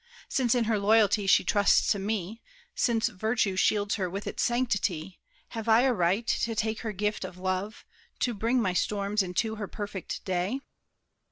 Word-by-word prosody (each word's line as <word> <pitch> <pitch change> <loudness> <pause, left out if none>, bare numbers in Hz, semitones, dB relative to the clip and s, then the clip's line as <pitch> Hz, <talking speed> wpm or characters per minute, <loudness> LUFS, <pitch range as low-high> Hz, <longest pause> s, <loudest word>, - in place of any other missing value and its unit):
Since 255 -3 +1
in 245 - +2
her 220 -2 0
loyalty 205 -1 +3
she - - +5
trusts 205 -1 +3
to 205 - +1
me, 210 +1 -3 0.3
Since 230 -2 +1
virtue 220 -1 0
shields 205 +2 +2
her 185 - 0
with 195 +3 -5
its - - -3
sanctity, 200 -8 -1 0.3
Have 225 -1 -5
I 225 +2 +6
a 260 0 +3
right 195 +3 +1
to 230 0 0
take 220 +1 -1
her 225 - -4
gift 210 +1 -2
of 185 -1 -7
love, 185 +3 -3 0.4
To 245 - +1
bring 230 +4 +1
my 185 -6 0
storms 200 +2 0
into 195 +4 -2
her 205 -2 -4
perfect 205 -3 -6
day?" 190 +8 -1
210 Hz, 175 wpm, -28 LUFS, 190-225 Hz, 0.4 s, I